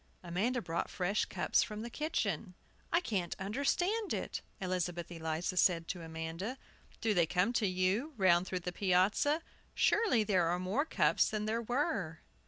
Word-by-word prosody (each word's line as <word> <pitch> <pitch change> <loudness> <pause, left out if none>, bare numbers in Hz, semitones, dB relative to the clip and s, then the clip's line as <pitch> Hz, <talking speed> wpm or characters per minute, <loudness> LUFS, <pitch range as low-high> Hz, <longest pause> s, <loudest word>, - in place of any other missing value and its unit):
Amanda 210 +8 -1
brought 170 -1 -2
fresh 195 +2 0
cups - - +1
from 215 -1 -3
the 235 - -5
kitchen. 200 - -2 0.4
"I 340 - +3
can't 195 - -2
understand 350 - 0
it," - - -4 0.2
Elizabeth 180 -2 -2
Eliza 160 +2 -2
said 170 -2 +3
to 180 - -3
Amanda. 165 +8 -5 0.4
"Do 225 -2 +2
they 175 -4 +3
come 180 +5 +2
back 240 - +1
to 210 - +1
you, 190 +11 0
round 185 -2 +4
through 185 -1 -2
the 180 - -3
piazza? 200 - +2 0.3
Surely 415 - +3
there 185 -5 +2
are 175 +1 +1
more 195 +11 0
cups - - +3
than 210 -1 -2
there 225 +2 0
were!" 230 - -1
190 Hz, 165 wpm, -33 LUFS, 175-235 Hz, 0.4 s, round